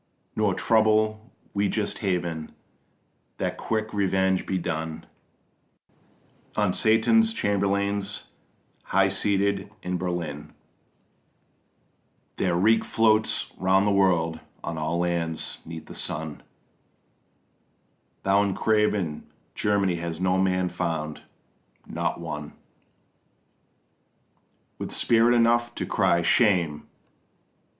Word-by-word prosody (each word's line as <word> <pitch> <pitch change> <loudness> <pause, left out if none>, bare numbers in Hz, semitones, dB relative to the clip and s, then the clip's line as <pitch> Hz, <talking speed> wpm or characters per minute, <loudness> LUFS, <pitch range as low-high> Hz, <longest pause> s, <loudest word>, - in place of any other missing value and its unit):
Nor 105 -3 +1
trouble 110 0 +2 0.2
we 100 0 +1
just 105 0 -2
Heaven 85 -5 -2 0.8
that - - -2
quick 110 -1 -2
revenge 95 -2 +1
be 95 - 0
done 80 -2 -4 1.5
On - - +2
Satan's 220 - +4
chamberlains 100 - -1 0.6
highseated 100 +1 +1
in 90 0 -2
Berlin; 85 -5 -4 1.8
Their 90 -3 +1
reek 110 +6 +4
floats 110 -1 +1
round 95 +1 +3
the 105 - +2
world 85 -5 +2 0.2
on 85 - -4
all 80 +2 -1
lands 85 -2 -2
'neath 80 -1 -7
the - - -10
sun: 80 -1 -4 1.8
Tho' 100 +1 +4
in 100 -2 0
craven 105 -7 +1 0.3
Germany 100 -4 +1
was 85 -1 -4
no 95 0 +2
man 95 -1 +1
found, 80 -3 -3 0.7
not - - -2
one 75 0 -6 2.3
With - - -4
spirit 115 +1 +3
enough 120 0 +3
to - - -3
cry 85 0 +2
Shame! 85 -8 +2
95 Hz, 95 wpm, -26 LUFS, 85-105 Hz, 2.3 s, Satan's